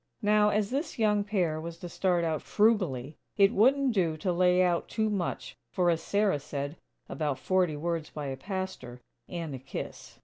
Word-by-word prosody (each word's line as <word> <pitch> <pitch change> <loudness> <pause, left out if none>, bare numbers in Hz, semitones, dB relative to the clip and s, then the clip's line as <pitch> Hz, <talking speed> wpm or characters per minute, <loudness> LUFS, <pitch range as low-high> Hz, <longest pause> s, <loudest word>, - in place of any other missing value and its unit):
Now, 210 0 +4
as 210 0 0
this 285 +4 -2
young 210 -2 +2
pair 180 -7 0
was 165 0 -7
to 175 - -7
start 175 0 +1
out 160 -2 -1
frugally, 180 - +1 0.2
it 200 +2 +5
wouldn't 260 +4 +4
do 170 -6 +1
to 180 +3 -1
lay 180 +1 +4
out 175 -2 +1
too 220 -1 -1
much 190 -4 -3 0.2
for, 175 -2 +2
as 165 -1 -1
Sarah 200 -4 +1
said, 140 +1 -5 0.3
"about 150 -4 -2
forty 180 +1 +1
words 165 0 -2
by 150 -1 -6
a 135 -1 -3
pastor, 185 -7 -5 0.3
and 165 -4 -4
a 130 - -5
kiss." 135 +2 -8
180 Hz, 180 wpm, -29 LUFS, 155-205 Hz, 0.3 s, it